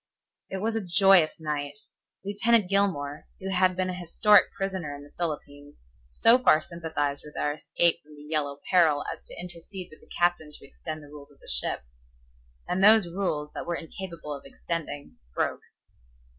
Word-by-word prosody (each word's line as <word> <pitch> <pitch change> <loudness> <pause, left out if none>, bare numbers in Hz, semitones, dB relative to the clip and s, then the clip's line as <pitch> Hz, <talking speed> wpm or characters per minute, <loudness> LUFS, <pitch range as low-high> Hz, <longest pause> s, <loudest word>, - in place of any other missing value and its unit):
'" - - -61
It 190 +1 -4
was 225 0 0
a 225 - -1
joyous 185 -2 +5
night. 145 -2 -3 0.5
Lieutenant 210 +1 +3
Gilmore, 180 -8 0
who 190 - -5
had 185 -1 +3
been 185 0 -1
an 180 - -6
historic 200 +4 +4
prisoner 190 -7 -3
in 145 - -10
the 145 - -16
Philippines, 145 -3 -5 0.3
so 225 - +4
far 205 -11 +5
sympathized 160 -4 -3
with 150 - -12
our 145 - 0
escape 170 +2 +1
from 150 0 -17
the 145 - -13
Yellow 150 -2 -2
Peril 160 -6 +4
as 165 - -15
to - - -9
intercede 180 +1 -8
with 155 - -16
the - - -20
captain 175 -3 +1
to - - -12
extend 155 +2 -7
the 145 - -14
rules 145 -1 -12
of 145 - -22
the - - -18
ship. - - -1 0.8
And 185 +2 0
those 215 -1 +8
rules 150 -6 -2
that - - -6
were 170 - -1
incapable 165 -2 -7
of 140 - -8
extending 145 0 -6 0.2
broke. - - -1
165 Hz, 180 wpm, -27 LUFS, 145-190 Hz, 0.8 s, those